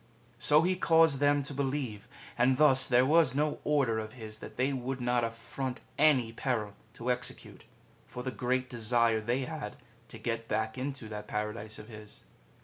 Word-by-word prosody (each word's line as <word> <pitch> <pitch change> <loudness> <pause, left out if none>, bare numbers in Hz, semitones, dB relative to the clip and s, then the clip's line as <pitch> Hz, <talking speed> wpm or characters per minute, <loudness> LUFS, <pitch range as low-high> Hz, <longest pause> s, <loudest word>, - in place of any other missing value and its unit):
So 150 +4 +4
he 185 +2 +2
caused 165 -5 +4
them 145 0 +3
to 140 - -4
believe; 135 -6 -3 0.3
and 125 +2 +3
thus 135 -3 +5
there 125 0 +4
was 150 -2 +4
no 150 +1 0
order 135 -7 +2
of 110 0 -6
his 110 -3 -9
that - - -10
they 130 +3 +1
would 130 0 -3
not 120 -1 +1
affront 125 +3 -4
any 135 -7 +3
peril 115 -5 -2 0.2
to 120 +2 -1
execute, 125 0 -5 0.4
for 125 - -7
the 130 - -3
great 130 0 -1
desire 115 -1 +1
they 120 +5 0
had 155 -10 -6 0.3
to - - -10
get 115 -1 -3
back 110 0 -1
into 130 -3 -4
that 105 -1 -7
Paradise 105 0 -4
of 105 - -10
his. 110 -2 -11
125 Hz, 175 wpm, -30 LUFS, 115-140 Hz, 0.4 s, thus